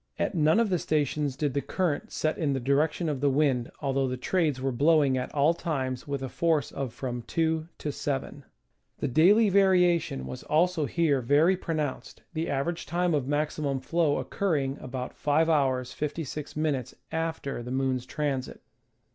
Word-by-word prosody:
At -, -, -1 dB
none 160 Hz, +4 st, +3 dB
of 225 Hz, -4 st, +1 dB
the 180 Hz, -, +2 dB
stations 150 Hz, -2 st, 0 dB
did 145 Hz, -1 st, -1 dB
the 140 Hz, -, 0 dB
current 175 Hz, -4 st, -2 dB
set 155 Hz, 0 st, 0 dB
in 145 Hz, -4 st, 0 dB
the 135 Hz, -, -1 dB
direction 150 Hz, +6 st, +1 dB
of 145 Hz, -4 st, -2 dB
the 145 Hz, -, +3 dB
wind, 135 Hz, -4 st, +1 dB
although 135 Hz, -1 st, 0 dB
the 130 Hz, 0 st, -3 dB
trades 155 Hz, -1 st, 0 dB
were 135 Hz, +1 st, -1 dB
blowing 145 Hz, +1 st, +3 dB
at 125 Hz, -1 st, -3 dB
all 150 Hz, +3 st, +3 dB
times 135 Hz, -7 st, -3 dB
with 140 Hz, -1 st, -3 dB
a -, -, -2 dB
force 155 Hz, 0 st, 0 dB
of 135 Hz, -3 st, -4 dB
from 120 Hz, 0 st, -4 dB
2 160 Hz, -1 st, 0 dB
to 150 Hz, -, -3 dB
1. 140 Hz, 0 st, -4 dB, 0.5 s
The -, -, -2 dB
daily 200 Hz, -, +5 dB
variation 180 Hz, -, +3 dB
was 65 Hz, -1 st, -7 dB
also 160 Hz, -1 st, +1 dB
here 150 Hz, -5 st, +1 dB
very 150 Hz, +9 st, +4 dB
pronounced, 155 Hz, -6 st, -4 dB
the 160 Hz, +1 st, -2 dB
average 165 Hz, +5 st, -2 dB
time 175 Hz, 0 st, +1 dB
of 140 Hz, -4 st, 0 dB
maximum 145 Hz, -1 st, -1 dB
flow 160 Hz, +2 st, +1 dB
occurring 145 Hz, -8 st, -1 dB
about 125 Hz, 0 st, -5 dB
5'^ 150 Hz, +3 st, +2 dB
56'" 145 Hz, 0 st, -1 dB, 0.2 s
after 160 Hz, -5 st, -3 dB
the 120 Hz, -, -7 dB
moon's 130 Hz, -1 st, -1 dB
transit. 140 Hz, -2 st, -3 dB
145 Hz, 165 wpm, -28 LUFS, 135-160 Hz, 0.5 s, daily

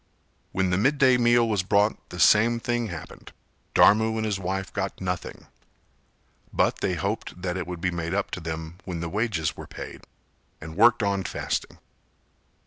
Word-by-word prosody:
When 95 Hz, -1 st, 0 dB
the 90 Hz, -, +2 dB
midday 135 Hz, +2 st, +4 dB
meal 120 Hz, -1 st, +4 dB
was 105 Hz, -4 st, +1 dB
brought 100 Hz, +3 st, +1 dB
the 90 Hz, -, -8 dB
same 115 Hz, +5 st, +5 dB
thing 120 Hz, 0 st, -1 dB
happened, 85 Hz, -5 st, -9 dB, 0.4 s
Dharmu 110 Hz, +2 st, +5 dB
and 110 Hz, -, -1 dB
his 105 Hz, -3 st, -1 dB
wife 95 Hz, 0 st, -3 dB
got -, -, -3 dB
nothing; 90 Hz, -2 st, -4 dB, 1.1 s
but -, -, +1 dB
they 90 Hz, -, -1 dB
hoped 100 Hz, +2 st, -3 dB
that 90 Hz, -1 st, -1 dB
it 90 Hz, -2 st, -4 dB
would 90 Hz, -2 st, -6 dB
be 90 Hz, -, 0 dB
made 85 Hz, +1 st, -3 dB
up 100 Hz, -, -1 dB
to -, -, -4 dB
them 80 Hz, +1 st, -6 dB
when 90 Hz, -3 st, -5 dB
the 85 Hz, 0 st, -4 dB
wages 100 Hz, -6 st, -1 dB
were -, -, -9 dB
paid, -, -, -9 dB, 0.5 s
and 80 Hz, +1 st, -9 dB
worked 115 Hz, +2 st, +5 dB
on 100 Hz, -1 st, 0 dB
fasting. -, -, -3 dB
95 Hz, 170 wpm, -26 LUFS, 90-110 Hz, 1.1 s, same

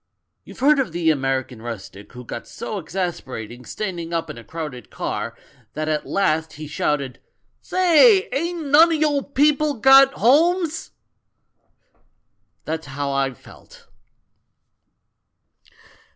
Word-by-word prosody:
You've -, -, -13 dB
heard 290 Hz, +1 st, +5 dB
of 245 Hz, -11 st, -1 dB
the 170 Hz, -2 st, +2 dB
American 135 Hz, -4 st, -2 dB
rustic 105 Hz, -3 st, -9 dB
who 125 Hz, 0 st, -10 dB
got -, -, -7 dB
so 210 Hz, -, -6 dB
exasperated 130 Hz, -, -5 dB
standing 175 Hz, -, -5 dB
up 165 Hz, -2 st, -2 dB
in -, -, -11 dB
a -, -, -12 dB
crowded 135 Hz, -3 st, -7 dB
car, -, -, -4 dB, 0.4 s
that 155 Hz, 0 st, -3 dB
at 155 Hz, -1 st, -2 dB
last 160 Hz, -5 st, 0 dB
he 155 Hz, +1 st, -8 dB
shouted, 140 Hz, -3 st, -2 dB, 0.4 s
'Say! 370 Hz, +3 st, +4 dB
ain't 335 Hz, +2 st, -2 dB
none 295 Hz, +4 st, +6 dB
o' -, -, +1 dB
you 300 Hz, -2 st, +1 dB
people 290 Hz, +2 st, +1 dB
got 270 Hz, +3 st, +6 dB
homes?' 330 Hz, -, +2 dB, 1.8 s
That 160 Hz, +1 st, -2 dB
was -, -, -17 dB
how 140 Hz, +1 st, -3 dB
I 135 Hz, -1 st, -1 dB
felt." -, -, -17 dB
170 Hz, 125 wpm, -22 LUFS, -, 1.8 s, none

